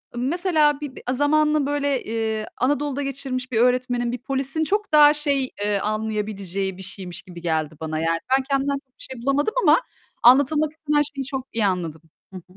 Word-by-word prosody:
mesela 300 +2 +2
bir 280 -3 -6
b - - -10
zamanını 300 +1 +2
böyle, 285 -2 0
eee, 220 -1 -2
Anadolu'da 285 +2 0
geçirmiş 265 -2 -4
bir 225 - +1
öğretmenin, 245 -1 +1
bir 245 - -3
polisin 275 +3 -1
çok 415 +5 -1
daha 295 -1 +8
şey, 285 -3 -1
eee, 205 -1 +1
anlayabileceği 205 -3 -3
bir 190 - -9
şeymiş 185 -2 -7
gibi 175 -2 -11
geldi 160 -2 -1
bana. 155 0 -3
Yani, 165 +1 0 0.2
ben 265 - -2
kendimden 275 +1 +1
çok 275 -2 -8
bir - - -10
şey 250 -3 -7
bulamadım 280 - +1
ama - - +5 0.4
anlatılmak 285 +5 +5
istenen 300 -2 0
şeyi 270 - -3
çok 265 -1 -5
iyi 225 -2 +1
anladım. 170 -5 -2 0.3
Hı - - -6
hı. 175 - -11
255 Hz, 180 wpm, -23 LUFS, 210-290 Hz, 0.4 s, daha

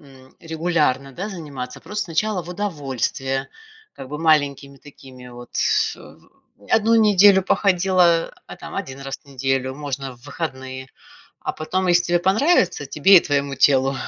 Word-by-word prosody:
м, 130 -2 -18
регулярно, 160 -5 -1
да, 195 +9 -5
заниматься. 145 -10 -8
Просто 210 0 -4
сначала 185 +3 -1
в 170 - -13
удовольствие, 135 - -3 0.4
как 130 - -10
бы 150 - -6
маленькими 145 -3 +1
такими 130 -3 -14
вот, 120 0 -12 0.5
э, - - -15 0.5
1 225 +1 +3
неделю 205 -3 +5
походила, 180 -3 +2
а - - -10
там - - -10
1 135 +1 -6
раз 135 0 -6
в - - -36
неделю 135 -1 -2
можно 135 -3 -6
в 120 - -26
выходные. 130 -4 -6 0.5
А - - -3
потом, 185 +4 -2
если 175 0 +4
тебе 175 0 +2
понравится, 190 - +2
тебе 180 +7 +6
и - - +1
твоему 140 -1 -1
телу 135 0 +3
150 Hz, 150 wpm, -21 LUFS, 135-180 Hz, 0.5 s, тебе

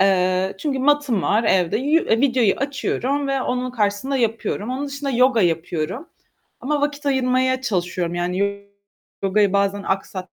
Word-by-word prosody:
Eee, 185 0 +2
çünkü 275 0 -2
matım 285 -7 +2
var 220 +3 +2
evde. 185 -1 +2
Yü 295 +5 +2
e 230 -5 +1
videoyu 250 -7 +3
açıyorum 275 0 -2
ve 270 -1 0
onun 250 0 -2
karşısında 215 +4 -1
yapıyorum. 230 -1 -1
Onun 275 +3 -3
dışında 280 0 -4
yoga 250 -1 +3
yapıyorum 165 - -2 0.5
ama 290 +2 -1
vakit 290 0 -2
ayırmaya 260 -1 +1
çalışıyorum. 180 -6 -2
Yani 200 +3 -2 0.6
yogayı 200 0 +2
bazen 200 0 +1
aksat 190 0 -2
235 Hz, 145 wpm, -21 LUFS, 195-270 Hz, 0.6 s, videoyu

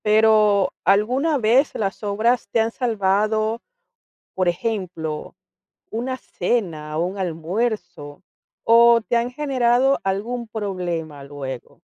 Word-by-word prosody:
Pero, 215 -2 +4
¿alguna 255 +10 +2
vez 250 +4 +2
las 195 -3 -3
obras 220 +4 0
te 230 - +1
han 225 +1 +1
salvado, 215 -1 0 0.7
por 185 -1 0
ejemplo, 175 -5 -3 0.6
una 250 +4 -3
cena, 170 -10 -3
un 180 +4 -2
almuerzo, 175 -3 -3 0.4
o 235 0 +6
te 235 +2 0
han 235 +1 -1
generado 265 -1 +2
algún 225 +5 -2
problema 175 -9 -4
luego? 135 -3 -8
215 Hz, 105 wpm, -22 LUFS, 180-235 Hz, 0.7 s, o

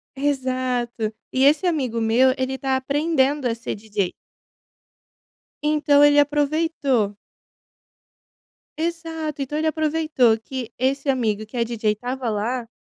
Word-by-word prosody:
Exato. 255 -5 -1 0.2
E 260 +1 +1
esse 300 +6 +4
amigo 265 -10 0
meu 240 +4 +4
ele 260 0 -2
tá 265 0 0
aprendendo 285 0 +1
a 230 - -1
ser 235 - -5
DJ. 205 -3 -2 1.5
Então 295 -1 +4
ele 290 0 +6
aproveitou 290 -6 +1 1.6
Exato. 325 -2 -3
Então, 275 +2 -4
ele 315 +1 0
aproveitou 310 -7 +2
que 245 0 -6
esse 275 +2 0
amigo 220 -5 0
que 215 - -14
é 235 - +2
DJ 225 -2 -1
estava 245 +2 -4
lá. 230 +3 -2
265 Hz, 120 wpm, -22 LUFS, 235-295 Hz, 1.6 s, ele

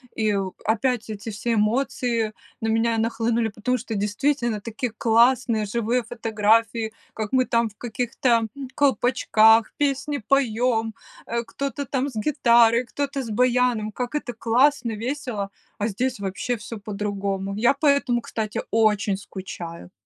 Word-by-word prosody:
и, 215 -2 +1
у, 190 -1 -3
опять 225 +1 0
эти 210 +2 -6
все 220 +3 -2
эмоции 230 0 0 0.3
на 225 - -1
меня 225 +1 +2
нахлынули, 230 0 0
потому 235 +5 -1
что 230 -1 -6
действительно 220 +2 0
такие 230 +2 -4
классные 235 -1 +3
живые 235 +3 0
фотографии. 225 -1 +1 0.2
Как 215 -2 -4
мы 255 -1 +3
там 230 -1 +1
в 210 - -23
каких-то, 245 +2 -2
м, 230 -2 +3 0.2
колпачках 230 -5 +4
песни 285 0 0
поем, 235 -4 +1 0.3
э, 235 0 -1
кто-то 275 +4 -4
там 270 +2 -1
с 250 - -13
гитарой, 235 0 +4
кто-то 280 +2 -3
с 235 - -6
баяном, 245 -1 +2
как 250 +5 -4
это 280 -5 -3
классно, 240 +2 +2
весело, 235 -5 -3 0.3
а 210 - 0
здесь 250 +4 -2
вообще 200 +5 -2
всё 220 +1 -8
по-другому. 200 -1 -3
Я 240 +5 +4
по 280 +2 -4
этому, 270 -4 +3
кстати, 215 -2 -3
очень 210 -3 +2
скучаю. 175 - -8
230 Hz, 145 wpm, -24 LUFS, 215-250 Hz, 0.3 s, колпачках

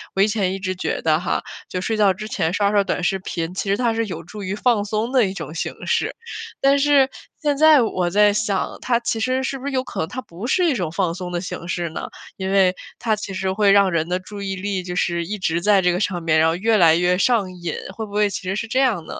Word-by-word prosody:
我 195 - +2
以 205 - +5
前 195 -4 0
一 195 - -4
直 185 -1 -2
觉 - - -2
得 155 0 +2
哈， 180 - -1 0.2
就 180 - -4
睡 220 +2 -1
觉 200 -3 +4
之 215 +3 -7
前 175 -8 -1
刷 205 0 +2
刷 205 -1 +3
短 180 -1 -2
视 190 +1 +1
频， 170 -1 -4
其 195 +1 -3
实 200 - +3
它 235 -1 +1
是 230 0 0
有 170 -4 -6
助 205 +4 -9
于 190 +2 -3
放 215 -2 +1
松 220 +4 -2
的 255 -5 +4
一 190 - -3
种 160 -4 -7
形 165 - -5
式， - - 0 0.5
但 275 +1 +4
是 275 -2 +4 0.3
现 290 -2 +1
在 310 -3 +7
我 185 -6 0
再 205 +2 +4
想 205 -2 -1
它 240 -2 +1
其 230 -1 -2
实 255 +3 0
是 270 0 -3
不 270 - -9
是 285 - -2
有 260 -1 0
可 - - -7
能 160 - -2
它 255 - -5
不 185 +5 -8
是 360 +7 +2
一 320 - +3
种 180 -10 -2
放 170 0 0
松 180 0 -6
的 175 - -1
形 180 -2 -6
式 175 -1 -2
呢？ 155 - -6 0.3
因 190 0 -3
为 190 -2 +4 0.2
它 220 -2 +1
其 200 -2 -6
实 190 0 -1
会 200 0 +3
让 200 -1 +5
人 165 0 0
的 180 +1 0
注 200 +2 -9
意 195 -1 -3
力 195 0 -2
就 180 0 -5
是 170 -1 0
一 210 +4 -4
直 170 -2 -1
在 200 0 +4
这 180 - +3
个 175 - -1
上 185 -4 -1
面， 155 -1 +3
然 160 - +4
后 165 - 0
越 220 +4 +2
来 165 -3 +6
越 180 +1 +2
上 200 -3 +2
瘾， 175 -3 -5 0.2
会 220 - -4
不 200 - -14
会 210 0 +2
其 195 - -5
实 185 +1 -2
是 230 - -3
这 255 +3 0
样 230 -12 +1
呢？ - - -7
195 Hz, 300 characters per minute, -21 LUFS, 180-225 Hz, 0.5 s, 在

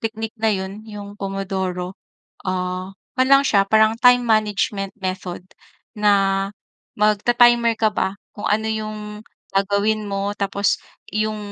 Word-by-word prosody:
technique 225 0 -4
na 220 0 +3
'yon, 195 +2 -5
yung 205 -1 -9
pomodoro, 190 -2 -3 0.5
ah, 185 0 -2 0.2
kuwan 255 0 +3
lang 275 0 +7
siya, 200 -5 +4
parang 220 +1 +4
time 245 -1 +6
management 210 -3 0
method 185 -2 -4 0.5
na 195 -2 +2 0.5
magta-timer 235 +3 +4
ka 220 -1 +3
ba, 190 -2 -1 0.2
kung 205 - -6
ano 220 +1 +1
yung 215 -1 -3 0.6
gagawin 205 +2 +1
mo 200 +1 -2
tapos 200 0 0 0.4
yung 215 0 0
205 Hz, 125 wpm, -21 LUFS, 195-220 Hz, 0.6 s, lang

